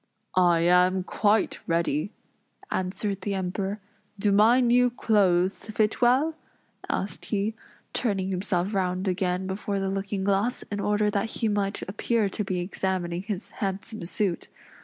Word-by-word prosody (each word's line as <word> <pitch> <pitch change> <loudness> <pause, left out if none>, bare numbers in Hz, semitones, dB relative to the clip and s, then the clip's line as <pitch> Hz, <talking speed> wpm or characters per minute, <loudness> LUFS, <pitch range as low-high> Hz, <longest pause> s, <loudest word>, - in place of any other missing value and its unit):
"I 175 -2 +4
am 180 +2 +4
quite 210 +3 +1
ready," 165 +1 0 0.6
answered 190 +1 -2
the 200 +1 -2
Emperor. 190 +2 -2 0.4
"Do 205 +1 +1
my 220 +5 +6
new 245 0 +4
clothes 195 -6 +2
fit 215 +1 0
well?" 260 +7 +4 0.6
asked 190 -3 -3
he, 210 +1 -1 0.4
turning 195 -5 0
himself 185 +1 -1
round 185 0 0
again 180 0 0
before 195 +1 -2
the 195 0 -1
looking 195 0 -2
glass, 200 +5 +1
in 205 - -2
order 210 +1 +1
that 205 +2 -1
he 225 - -1
might 205 -1 -1
appear 210 +2 0
to 210 - -3
be 185 -2 -2
examining 180 -1 -2
his 200 -1 -5
handsome 200 +2 -3
suit. 190 0 -1
195 Hz, 140 wpm, -26 LUFS, 185-210 Hz, 0.6 s, my